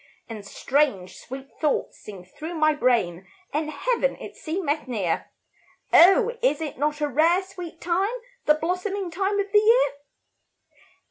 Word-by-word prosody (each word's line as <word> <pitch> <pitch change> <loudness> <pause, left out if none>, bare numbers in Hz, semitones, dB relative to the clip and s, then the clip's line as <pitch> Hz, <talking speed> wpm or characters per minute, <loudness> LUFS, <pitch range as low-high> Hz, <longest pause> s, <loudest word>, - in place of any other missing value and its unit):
And 220 -3 -8
strange, 200 -3 0
sweet 265 +1 -9
thoughts 300 -3 -1
sing 195 -4 -11
through 315 - -8
my 310 -1 +3
brain, 205 - 0 0.3
And 305 +1 -1
Heaven, - - 0
it - - -10
seemeth 315 -4 -3
near; 195 -9 -2 0.6
Oh, 425 +7 +6
is 460 -12 +2
it 305 -5 -5
not 300 +1 -1
a 295 - +2
rare, 330 +7 +3
sweet 355 -3 -9
time, 360 +4 0 0.4
The 300 - +6
blossoming 365 +3 -2
time 390 +4 -1
of 400 0 -2
the 420 - +6
year? 465 +4 +4
310 Hz, 145 wpm, -24 LUFS, 270-380 Hz, 0.6 s, Oh